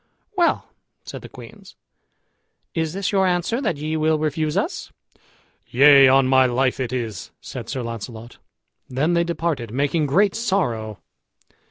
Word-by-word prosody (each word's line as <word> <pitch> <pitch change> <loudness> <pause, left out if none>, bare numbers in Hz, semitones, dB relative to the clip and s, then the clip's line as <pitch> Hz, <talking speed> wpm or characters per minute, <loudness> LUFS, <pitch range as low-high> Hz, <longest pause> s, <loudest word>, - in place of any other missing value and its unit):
"Well," 350 -3 0 0.3
said - - -8
the - - -11
queens, - - -13 1.0
"is 160 -1 -2
this 195 +1 -2
your 190 -2 +2
answer, 180 +8 0
that 215 - -1
ye 155 +2 -3
will 155 0 +2
refuse 155 0 -1
us." - - -3 0.8
"Yea, 140 +1 +7
on 135 +1 +5
my 130 0 +4
life 130 +2 0
it 125 -2 -2
is," 115 -4 -4
said - - -8
Sir 130 - -3
Launcelot. 115 0 -8 0.5
Then 145 +7 0
they 170 0 +3
departed, 165 -8 -2
making 145 +4 0
great 195 +8 +3
sorrow. 125 - -1
150 Hz, 145 wpm, -22 LUFS, 130-170 Hz, 1.0 s, Yea